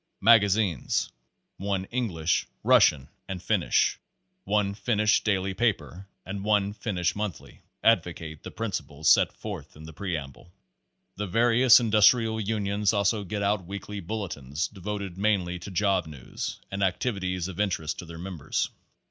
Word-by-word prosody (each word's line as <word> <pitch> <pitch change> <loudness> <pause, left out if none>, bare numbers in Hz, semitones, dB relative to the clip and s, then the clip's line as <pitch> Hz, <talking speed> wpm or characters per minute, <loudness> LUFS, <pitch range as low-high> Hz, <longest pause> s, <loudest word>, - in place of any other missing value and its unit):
Mag 115 +1 +7
azines: 100 - 0 0.5
one 95 -1 -2
English, 90 -10 0 0.2
Russian 65 -3 +5 0.2
and 95 -1 -4
Finnish, - - +1 0.5
one 100 0 +1
Finnish 105 -1 +2
daily 95 -2 0
paper 100 -4 -1 0.2
and 100 +1 -5
one 105 -1 +2
Finnish 95 -5 -2
monthly, 105 -5 -6 0.2
advocate 85 -7 +1
the - - -8
principles 80 -9 -4
set - - +6
forth - - -8
in 75 - -12
the 80 0 -10
preamble. 80 -3 -6 0.7
The 105 0 -3
various 120 +4 +6
Industrial 110 0 +4
Union's 105 0 0
also 100 +1 +1
get 100 +2 -3
out 100 -2 0
weekly 100 +1 -6
Bulletins 90 -5 -4
devoted 100 -2 -6
mainly 95 -4 +1
to 85 - -8
job 95 -2 +1
news 75 -5 -6
and 100 0 -4
activities 95 -2 -1
of 95 -1 -8
interest 85 -6 -1
to - - -7
their 85 0 -9
members. 85 -4 -3
100 Hz, 140 wpm, -27 LUFS, 90-105 Hz, 0.7 s, Mag